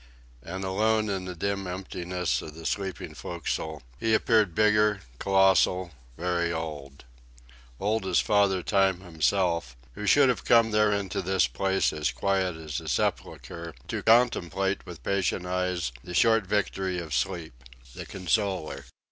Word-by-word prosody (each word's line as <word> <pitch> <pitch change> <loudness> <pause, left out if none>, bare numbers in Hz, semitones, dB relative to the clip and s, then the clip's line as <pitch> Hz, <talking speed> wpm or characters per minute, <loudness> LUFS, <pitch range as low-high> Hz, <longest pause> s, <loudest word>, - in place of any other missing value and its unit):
And 95 +8 -6
alone 110 +3 +1
in 95 -2 -2
the 90 -1 -6
dim 100 +2 -2
emptiness 90 -4 -3
of 75 - -9
the 80 0 -10
sleeping 95 -2 -3
forecastle 80 -3 -4 0.2
he 110 -1 +2
appeared 110 -7 +2
bigger, 105 -2 +3 0.2
colossal, 95 -2 +3 0.3
very 85 0 0
old; 75 -5 -6 0.7
old 105 0 0
as 90 - +3
Father 100 -3 +2
Time 95 -3 +2
himself, 85 -5 0 0.2
who 105 +9 -5
should 145 +3 +6
have 125 - 0
come 115 -1 +4
there 105 0 +3
into 100 -2 -1
this 95 +1 +2
place 95 +11 0
as 75 -1 0
quiet 95 -3 0
as 80 -4 -5
a - - -11
sepulchre 85 -1 -3
to - - -2
contemplate 100 -5 +2
with 90 -2 -10
patient 95 -2 0
eyes 90 -5 -1
the 90 - -7
short 110 -1 +4
victory 95 -2 -1
of 80 -4 -5
sleep, 85 -6 -2 0.4
the - - -8
consoler. 95 -7 -1
95 Hz, 145 wpm, -27 LUFS, 85-100 Hz, 0.7 s, should